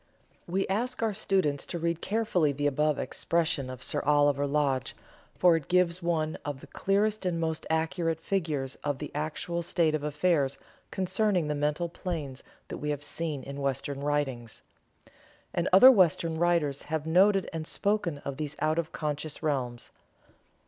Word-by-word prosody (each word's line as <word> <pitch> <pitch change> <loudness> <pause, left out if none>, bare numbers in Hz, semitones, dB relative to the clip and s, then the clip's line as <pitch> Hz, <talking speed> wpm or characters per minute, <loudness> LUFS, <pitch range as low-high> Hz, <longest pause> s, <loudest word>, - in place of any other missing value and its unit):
We 190 +3 0
ask 230 +5 -1
our 220 -2 +1
students 190 -8 0
to 175 - -3
read 170 0 -1
carefully 205 -8 +1
the 145 +1 -3
above 150 +1 +2
expression 160 -6 -1
of 130 -1 -7
Sir - - 0
Oliver 145 -1 +3
Lodge, 140 -3 0 0.4
for 175 -2 +5
it 160 -4 -3
gives 180 0 +2
one 160 -2 -1
of 145 -2 -4
the - - -12
clearest 205 +2 0
and 175 -2 -1
most 160 -1 -2
accurate 165 0 0
figures 155 -8 -2
of 145 -2 -1
the 150 - -6
actual 155 +3 -3
state 170 -2 +1
of 155 - 0
affairs 150 -2 +1 0.3
concerning 185 -3 0
the - - +1
mental 150 +4 0
planes 160 -7 -5 0.3
that - - -5
we 150 - -3
have 145 -1 -2
seen 150 -4 -4
in 140 +1 -7
Western 140 0 -2
writings. 135 -6 -2 0.9
And 175 - 0
other 225 +8 +10
Western 165 - +3
writers 165 -5 +1
have 160 -1 -2
noted 190 +4 +4
and 160 -1 -4
spoken 200 -7 0
of 140 -1 -4
these 150 -1 -4
out 155 +2 +1
of 165 -1 -3
conscious 150 +1 -4
realms. 125 -6 -2
160 Hz, 160 wpm, -28 LUFS, 145-175 Hz, 0.9 s, other